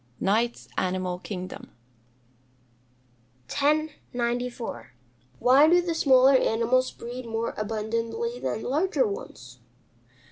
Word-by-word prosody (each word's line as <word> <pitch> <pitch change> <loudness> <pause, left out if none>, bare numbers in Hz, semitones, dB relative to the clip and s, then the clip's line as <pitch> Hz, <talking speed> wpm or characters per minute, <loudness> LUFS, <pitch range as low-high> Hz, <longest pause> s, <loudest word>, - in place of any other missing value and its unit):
Knight's 225 +4 0
Animal 185 -1 -2
Kingdom. 185 -1 -7 1.8
1094. 245 - -2 0.5
_Why 275 +5 +6
do 350 +1 +6
the 350 -1 -1
smaller 265 -4 +5
animals 255 +1 +2
breed 245 +1 -8
more 225 0 -2
abundantly 230 - -3
than 220 - -3
the - - -4
larger 295 0 +1
ones? 125 - -7
240 Hz, 95 wpm, -26 LUFS, 215-275 Hz, 1.8 s, Why